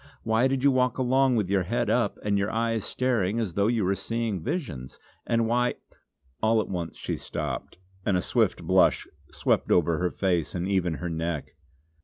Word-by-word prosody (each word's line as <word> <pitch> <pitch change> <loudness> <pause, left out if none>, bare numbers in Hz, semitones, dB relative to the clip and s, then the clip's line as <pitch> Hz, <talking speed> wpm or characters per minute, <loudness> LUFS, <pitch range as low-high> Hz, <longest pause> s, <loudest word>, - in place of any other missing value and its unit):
Why 115 +3 +3
did 135 -1 -1
you 140 - +6
walk 125 -2 +1
along 130 0 +3
with 105 -5 +1
your 100 -1 +3
head 120 +7 -1
up 125 - +1
and 105 -1 +1
your 100 +1 +1
eyes 115 -1 -1
staring, 115 -5 0
as 105 -7 -2
though 100 +3 +2
you 115 -4 +1
were 95 - +2
seeing 110 0 -2
visions? 75 - -4 0.3
And 115 -1 +2
why 125 +1 +1 0.3
" 70 -1 -41
All 110 +1 +3
at 110 - -1
once 85 -4 -4
she - - -3
stopped, - - -5 0.3
and 95 -3 +2
a - - 0
swift - - +1
blush - - +3 0.3
swept - - 0
over 85 -2 +3
her 90 0 +1
face 90 -4 -1
and 90 +1 -2
even 90 -4 +1
her 90 +2 -4
neck. 80 -2 -3
105 Hz, 195 wpm, -26 LUFS, 90-120 Hz, 0.3 s, you